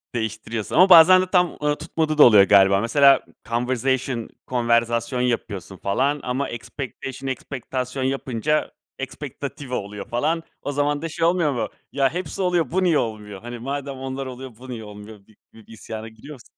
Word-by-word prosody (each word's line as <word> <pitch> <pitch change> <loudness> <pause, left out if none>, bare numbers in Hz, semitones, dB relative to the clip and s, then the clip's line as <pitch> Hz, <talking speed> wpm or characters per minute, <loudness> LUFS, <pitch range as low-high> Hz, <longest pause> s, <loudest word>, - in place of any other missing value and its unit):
Değiştiriyorsun 110 0 -4
ama 185 +2 +6
bazen 185 +2 +9
de - - 0
tam, 180 -2 +2
ııı, 150 0 +2
tutmadığı 155 0 -2
da - - +9
oluyor, 105 -5 +8
galiba. 100 0 +5
Mesela, 140 +4 +5 0.3
conversation 125 0 -1 0.2
konverzasyon 120 0 +1
yapıyorsun 100 -6 -3
falan 135 +11 0
ama 130 +3 -2
expectation 135 +2 -7
ekspektasyon 130 0 -4
yapınca 135 +2 -1 0.3
expectative 135 -3 -7
oluyor 100 0 -6
falan. 155 +7 0 0.2
O 145 - -3
zaman 145 +1 0
da 165 - -4
şey 165 +1 -1
olmuyor 170 -4 +2
mu? 115 -4 -2 0.2
Ya, 135 -1 +2
hepsi 180 +1 -4
oluyor, 175 -3 +1
bu 190 +1 +1
niye 165 -4 +3
olmuyor? 105 -3 -4
Hani, 120 0 -7
madem 140 +2 -4
onlar 135 +1 -5
oluyor, 130 -2 -8
bu 130 +1 -12
niye 115 -3 -6
olmuyor 105 +1 -11
gibi 100 +2 -25 0.2
bir 110 -2 -17
isyana 110 0 -8
giriyor 110 +7 -12
musun? 125 - -14
130 Hz, 165 wpm, -23 LUFS, 115-145 Hz, 0.3 s, bazen